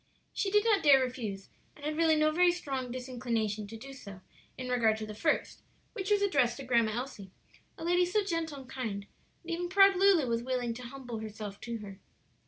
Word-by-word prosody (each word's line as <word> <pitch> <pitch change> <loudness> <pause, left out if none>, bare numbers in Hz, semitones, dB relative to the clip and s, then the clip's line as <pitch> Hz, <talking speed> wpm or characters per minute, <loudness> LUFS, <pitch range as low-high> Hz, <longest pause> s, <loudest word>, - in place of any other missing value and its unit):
She 400 - -1
did 415 +2 +3
not 425 -3 +4
dare 280 -3 +7
refuse, 230 -7 -4 0.3
and 295 - -11
had 305 0 -1
really 325 0 +4
no 310 0 +3
very 355 +2 +4
strong 270 -7 -4
disinclination 235 -5 -2
to 225 +2 -8
do 270 +4 -10
so 200 -8 -11 0.4
in 255 - -5
regard 230 -3 +2
to 220 - -5
the 215 - -7
first, 305 +9 -1 0.3
which 390 -3 -4
was 410 -1 +3
addressed 270 -11 +2
to 275 - -7
Grandma 235 -4 +2
Elsie 235 -6 -6 0.5
a - - -8
lady 355 +1 +3
so 420 +3 +1
gentle 330 -6 -3
and 260 - -14
kind 225 -7 -4 0.4
that 340 - -7
even 350 +1 -2
proud 390 +1 +6
Lulu 375 -5 +5
was 230 -1 0
willing 245 -1 -2
to 245 - -9
humble 245 -2 -7
herself 210 -2 -7
to 235 0 -4
her. 195 -2 -9
255 Hz, 205 wpm, -31 LUFS, 225-330 Hz, 0.5 s, dare